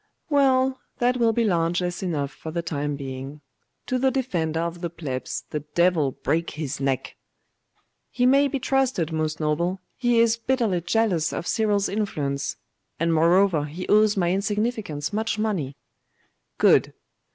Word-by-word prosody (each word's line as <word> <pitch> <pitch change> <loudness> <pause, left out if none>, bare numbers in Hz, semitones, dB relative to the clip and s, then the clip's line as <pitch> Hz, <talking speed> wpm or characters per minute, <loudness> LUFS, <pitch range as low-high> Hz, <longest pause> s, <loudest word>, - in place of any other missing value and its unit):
'Well, 265 -2 +3 0.2
that 245 +1 +2
will 230 -2 +3
be 230 +1 +1
largess 175 -2 0
enough 150 -7 -2
for 160 - -9
the 170 +1 -3
time 145 -3 -2
being. 135 +1 -7 0.4
To 255 - -1
the 265 +1 +3
Defender 175 - -1
of 170 0 -4
the 170 - -2
Plebs 140 -6 -5
the 150 - -1 0.2
devil 170 -5 +3
break 165 +5 -1
his 150 -2 -5
neck!' 135 -2 -2 0.9
'He 245 - 0
may 275 +2 +5
be 275 - -2
trusted, 260 - 0
most 155 -1 -2
noble; 170 +5 0 0.2
he 240 -2 +2
is 230 0 +4
bitterly 230 -7 0
jealous 175 -3 +1
of - - -4
Cyril's 205 -2 +1
influence. 150 -10 -2 0.4
And 165 +1 +2
moreover, 170 0 +4
he 160 +5 -7
owes 210 0 +4
my 175 -2 +2
insignificance 205 -5 -2
much 220 +1 -1
money.' 190 -11 -1 0.8
'Good! - - +4
180 Hz, 150 wpm, -24 LUFS, 155-225 Hz, 0.9 s, may